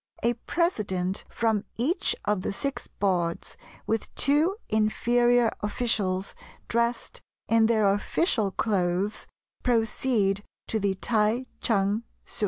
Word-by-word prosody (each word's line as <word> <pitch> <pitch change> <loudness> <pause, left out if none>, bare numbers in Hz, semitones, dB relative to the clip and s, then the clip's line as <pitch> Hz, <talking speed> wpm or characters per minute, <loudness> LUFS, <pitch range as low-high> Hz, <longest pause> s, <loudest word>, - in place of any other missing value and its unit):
A 235 +1 +3
president 210 - -1
from 220 -3 0
each 290 - +1
of 205 -2 +1
the - - -2
six 275 +7 -4
boards, 175 -4 -1 0.3
with 225 -1 -2
two 300 +7 +3
inferior 240 +2 +3
officials, 205 -3 -1 0.3
dressed 235 +1 -1 0.3
in 225 -1 +4
their 220 -3 +3
official 205 - +1
clothes, 190 0 -1 0.3
proceed 225 -4 +1 0.3
to 220 - 0
the 200 -1 0
T'ai 220 +4 +1 0.2
Ch'ang 205 0 +1 0.2
Ssu. - - -8
220 Hz, 110 wpm, -27 LUFS, 195-240 Hz, 0.3 s, in